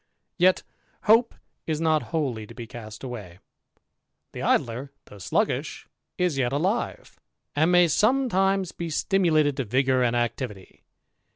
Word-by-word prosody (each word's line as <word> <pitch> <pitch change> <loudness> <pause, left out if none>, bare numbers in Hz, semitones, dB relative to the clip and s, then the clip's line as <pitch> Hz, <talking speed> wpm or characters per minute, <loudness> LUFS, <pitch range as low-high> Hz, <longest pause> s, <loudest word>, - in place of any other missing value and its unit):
Yet 185 +1 +4 0.4
hope 230 +3 +4 0.3
is 155 -2 -1
not 160 -2 +2
wholly 130 -10 -2
to 115 - -13
be 120 - -7
cast 110 -1 -10
away. 105 -9 -7 0.9
The - - -7
Idler, 125 +4 0
though 105 - -14
sluggish, 95 - -1 0.3
is 175 -6 0
yet 120 -2 +1
alive, 185 +11 -2 0.4
and 160 +4 +3
may 175 -1 +6
sometimes 195 - +2
be 170 -1 -5
stimulated 155 -4 +2
to 135 - 0
vigour 130 +3 +1
and 120 -1 +2
activity. 120 -4 -3
145 Hz, 130 wpm, -25 LUFS, 120-180 Hz, 0.9 s, may